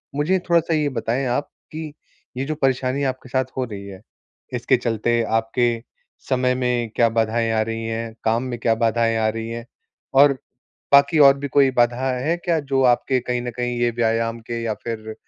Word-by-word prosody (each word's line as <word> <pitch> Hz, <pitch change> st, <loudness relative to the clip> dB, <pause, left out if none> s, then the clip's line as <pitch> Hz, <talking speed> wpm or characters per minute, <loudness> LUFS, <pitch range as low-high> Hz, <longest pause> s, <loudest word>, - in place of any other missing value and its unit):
मुझे 160 Hz, +6 st, +1 dB
थोड़ा-सा 170 Hz, -1 st, +3 dB
ये 150 Hz, -2 st, +1 dB
बताएँ 130 Hz, 0 st, -2 dB
आप 125 Hz, +4 st, -1 dB, 0.2 s
कि 155 Hz, -1 st, -6 dB, 0.4 s
ये 135 Hz, -, -1 dB
जो 155 Hz, +2 st, -3 dB
परेशानी 135 Hz, -1 st, 0 dB
आपके 130 Hz, -1 st, -3 dB
साथ 130 Hz, +1 st, +1 dB
हो 130 Hz, -, +1 dB
रही 100 Hz, -4 st, -8 dB
है, 95 Hz, -1 st, -10 dB, 0.5 s
इसके 125 Hz, +1 st, +2 dB
चलते 120 Hz, 0 st, 0 dB
आपके 115 Hz, +2 st, +1 dB, 0.6 s
समय 125 Hz, -1 st, +2 dB
में 125 Hz, -2 st, -1 dB
क्या 115 Hz, -1 st, +4 dB
बाधाएँ 115 Hz, 0 st, 0 dB
आ 110 Hz, -, +2 dB
रही 115 Hz, +1 st, -3 dB
हैं, 115 Hz, 0 st, -4 dB
काम 115 Hz, +2 st, +1 dB
में 125 Hz, -2 st, -4 dB
क्या 115 Hz, 0 st, +2 dB
बाधाएँ 115 Hz, 0 st, +1 dB
आ 110 Hz, -1 st, +1 dB
रही 115 Hz, +1 st, -4 dB
हैं 115 Hz, 0 st, -6 dB, 0.6 s
और 145 Hz, -1 st, +6 dB, 0.6 s
बाकी 140 Hz, +3 st, +6 dB
और 140 Hz, -1 st, +7 dB
भी 140 Hz, -, -4 dB
कोई 140 Hz, -1 st, +4 dB
बाधा 125 Hz, +1 st, +1 dB
है 160 Hz, +7 st, 0 dB
क्या, 170 Hz, -2 st, 0 dB
जो 135 Hz, -2 st, 0 dB
आपके 125 Hz, +1 st, +3 dB
कहीं 125 Hz, 0 st, -2 dB
न 120 Hz, 0 st, -4 dB
कहीं 120 Hz, 0 st, -2 dB
ये 120 Hz, 0 st, +2 dB
व्यायाम 115 Hz, 0 st, 0 dB
के 115 Hz, +1 st, -5 dB
या 115 Hz, -1 st, -1 dB
फिर 110 Hz, -2 st, -5 dB
120 Hz, 190 wpm, -22 LUFS, 115-135 Hz, 0.6 s, और